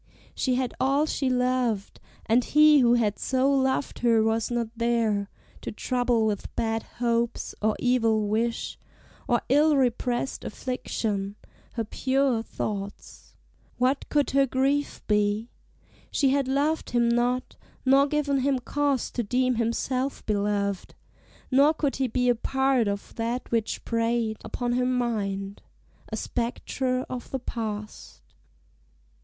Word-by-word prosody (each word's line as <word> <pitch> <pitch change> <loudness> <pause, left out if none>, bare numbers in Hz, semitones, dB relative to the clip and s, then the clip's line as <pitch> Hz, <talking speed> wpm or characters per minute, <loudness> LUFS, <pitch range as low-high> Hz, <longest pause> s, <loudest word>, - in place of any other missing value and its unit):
she 255 -2 0
had 255 -1 -1
all 275 +3 +2
she 275 -3 -1
loved, 250 -5 0 0.3
And 235 +2 +3
he 300 +1 +6
who 240 -2 +5
had 215 -4 +1
so 265 +1 +1
loved 265 0 0
her 230 -2 +3
was 225 0 0
not 240 -2 -1
there 225 -4 +1 0.3
To - - -5
trouble 245 0 0
with 210 -2 -3
bad 225 0 0
hopes, 235 0 -2
or 215 0 +2
evil 225 -4 +2
wish, 230 +3 -1 0.5
Or 240 -1 +2
ill 295 +2 +4
repressed 250 0 0
affliction, 210 -5 -3 0.4
her 230 - -1
pure 260 +1 +1
thoughts. 205 -3 -6 0.4
What 255 +3 0
could 290 -1 +1
her 275 0 +3
grief 275 +3 0
be? 210 +2 +1 0.6
she 275 - +2
had 275 0 +1
loved 290 +4 0
him 240 -1 +2
not, 245 +2 0 0.3
Nor 275 +2 +5
given 285 -2 0
him 270 0 +1
cause 280 +1 -1
to 245 - -1
deem 250 +3 +1
himself 255 +3 -1
beloved, 200 -2 -1 0.6
Nor 285 +4 +5
could 285 -3 -1
he 265 -1 +1
be 250 +1 0
a 245 - +5
part 265 0 +1
of 200 0 -4
that 235 +2 -3
which 230 -2 -1
preyed 230 -1 0
Upon 245 -1 -3
her 250 +1 +1
mind 205 -6 -2 0.5
a 220 - -3
spectre 255 +2 -2
of 250 -2 -6
the 265 - -2
past. 215 -4 -6
245 Hz, 135 wpm, -26 LUFS, 225-265 Hz, 0.6 s, he